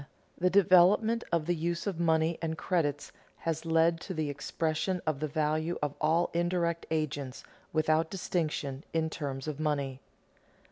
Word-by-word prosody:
_The 180 0 +3
development 200 +5 +5
of 165 -3 +1
the 175 - +1
use 170 +1 -2
of 195 -5 -2
money 160 0 +2
and 160 -1 -2
credit 145 -6 -1 0.3
has 165 0 -3
led 165 +1 +3
to 185 - -6
the 155 -2 -1
expression 160 +5 -1
of 155 -3 0
the 155 - -1
value 155 +2 0
of 145 -1 -1
all 160 +3 +2
indirect 170 -1 0
agents, 145 -4 -2 0.3
without 155 +1 +2
distinction, 155 -7 -2
in 160 -1 0
terms 135 -3 -4
of 150 -1 -4
money. 140 -4 -1
160 Hz, 150 wpm, -30 LUFS, 150-170 Hz, 0.3 s, development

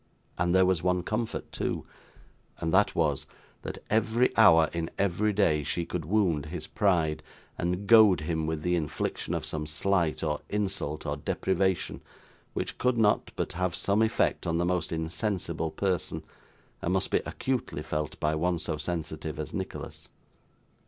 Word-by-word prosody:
And 90 +1 +1
there 95 0 +6
was 90 -3 +2
one 90 0 +1
comfort 110 +4 -3
too; - - -2 0.7
and 80 -1 -2
that 105 +2 +4
was, 75 -5 +1 0.3
that - - -5
every 110 +3 +2
hour 80 -1 +7
in 85 -1 -2
every 100 +2 +1
day 85 -7 +2
she 85 +4 -2
could 80 -3 -4
wound 85 -6 +1
his 80 -1 -5
pride, 85 -5 +1 0.3
and 90 +3 -2
goad 105 -6 +7
him 80 0 -1
with 80 -1 -2
the 90 0 +2
infliction 80 -4 -2
of - - -3
some 75 -1 -3
slight, 85 0 0
or 75 -2 -1
insult, 95 -7 -2
or 70 -1 -2
deprivation, 95 +4 0 0.5
which - - -3
could 125 -1 +2
not 105 -2 +2
but - - -2
have 90 -1 -1
some 100 +4 +2
effect 110 -4 +1
on 85 0 +1
the 85 - +1
most 90 0 0
insensible 80 0 -2
person, 90 +1 -2 0.6
and - - 0
must - - 0
be - - +4
acutely 125 - -2
felt 75 -1 -3
by 75 +1 +1
one 85 +3 +1
so 80 -2 -2
sensitive 80 -2 -4
as - - -5
Nicholas. - - -6
85 Hz, 160 wpm, -28 LUFS, 80-100 Hz, 0.7 s, hour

